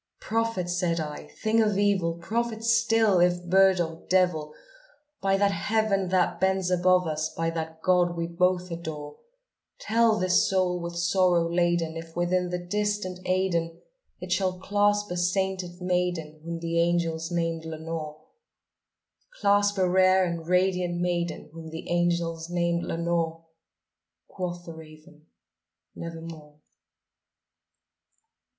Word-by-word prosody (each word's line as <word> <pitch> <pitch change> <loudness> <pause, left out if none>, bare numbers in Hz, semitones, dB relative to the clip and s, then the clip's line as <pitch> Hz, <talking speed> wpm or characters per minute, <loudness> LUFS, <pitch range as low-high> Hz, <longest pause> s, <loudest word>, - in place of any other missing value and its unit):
"Prophet!' 225 -5 -1
said 175 -1 0
I, 150 -2 -5 0.2
"thing 220 +1 +3
of 210 -3 +1
evil! 195 -5 +1
prophet 225 +5 -3
still, 225 -4 +3
if 175 0 +2
bird 190 +1 +4
or 165 -1 -3
devil! 180 -5 +2 0.7
By 195 0 +2
that 200 0 +3
Heaven 200 -1 0
that 185 -1 +1
bends 190 -1 +1
above 180 0 +3
us 155 0 -2
by 165 0 -2
that 160 -1 -6
God 175 -1 +2
we 170 - -1
both 180 +1 0
adore 155 -3 -6 0.6
Tell 225 0 +2
this 185 -1 +3
soul 185 -2 +1
with 170 0 -5
sorrow 175 0 +2
laden 170 -1 0
if, 165 0 -8
within 180 +1 0
the 180 - -2
distant 205 0 -2
Aidenn, 175 -3 0 0.4
It - - -8
shall 185 -2 +1
clasp 205 +1 +1
a 180 - -2
sainted 180 0 -1
maiden 180 -4 -2
whom 170 0 -4
the 165 0 -1
angels 170 -1 0
named 165 -2 -1
Lenore 160 -1 -6 1.1
Clasp 205 0 +3
a 185 -1 +3
rare 185 +1 +4
and 170 -2 -4
radiant 180 -1 +1
maiden, 175 -3 -2
whom 165 -1 -9
the 160 +1 -8
angels 170 -1 0
named 170 -1 0
Lenore?" 165 -1 -2 0.8
Quoth 175 -2 -5
the 165 - -8
raven, 155 -1 -15 0.7
"Nevermore." 165 -3 -9
175 Hz, 130 wpm, -26 LUFS, 165-190 Hz, 1.1 s, bird